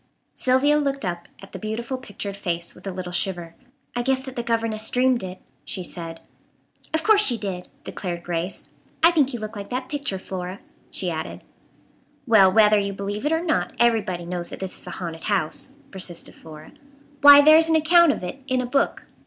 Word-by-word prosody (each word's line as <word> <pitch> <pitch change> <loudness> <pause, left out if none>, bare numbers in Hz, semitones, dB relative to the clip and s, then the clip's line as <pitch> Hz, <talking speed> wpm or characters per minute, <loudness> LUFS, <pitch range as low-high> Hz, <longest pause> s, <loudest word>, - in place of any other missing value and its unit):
Sylvia 270 +4 +3
looked 275 -4 -1
up 175 -1 -4 0.2
at 195 - -12
the - - -7
beautiful 230 +4 -4
pictured 205 -5 -6
face 170 -4 -3
with - - -12
a - - -2
little 180 -1 -6
shiver. 175 -2 -1 0.4
"I 240 - 0
guess 265 +1 +1
that 265 -1 -8
the 240 - -2
governess 225 -2 -1
dreamed 250 -1 +2
it," 185 0 -6 0.3
she 185 - -4
said. 165 -2 -6 0.7
"Of 320 -1 -1
course 430 -1 +5
she 245 - +5
did," 190 -4 -5 0.2
declared 175 -3 -5
Grace. 175 +2 -4 0.4
"I 335 - +8
think 290 -5 +2
you 240 - -4
look 215 +1 -6
like 200 -1 -7
that 255 +1 -4
picture, 280 -9 -3
Flora," 185 0 -6 0.3
she 180 -2 -2
added. 160 -1 -6 0.8
"Well, 210 -6 +6
whether 210 0 +5
you 200 0 -2
believe 205 +6 -3
it - - 0
or 325 +1 +1
not, 320 -3 0
everybody 215 -7 +1
knows 175 0 -3
that - - -8
this 190 -1 -4
is - - -10
a - - -6
haunted 165 -3 -6
house," 200 +6 -2 0.2
persisted 180 -3 -6
Flora. 155 -1 -13 0.5
"Why, 285 0 +10
there 310 +2 +8
is 325 0 +3
an 320 - +4
account 335 +1 +5
of - - -5
it 180 +10 -6
in 255 -1 +1
a 250 - -1
book." 275 +3 0
215 Hz, 200 wpm, -23 LUFS, 180-265 Hz, 0.8 s, Why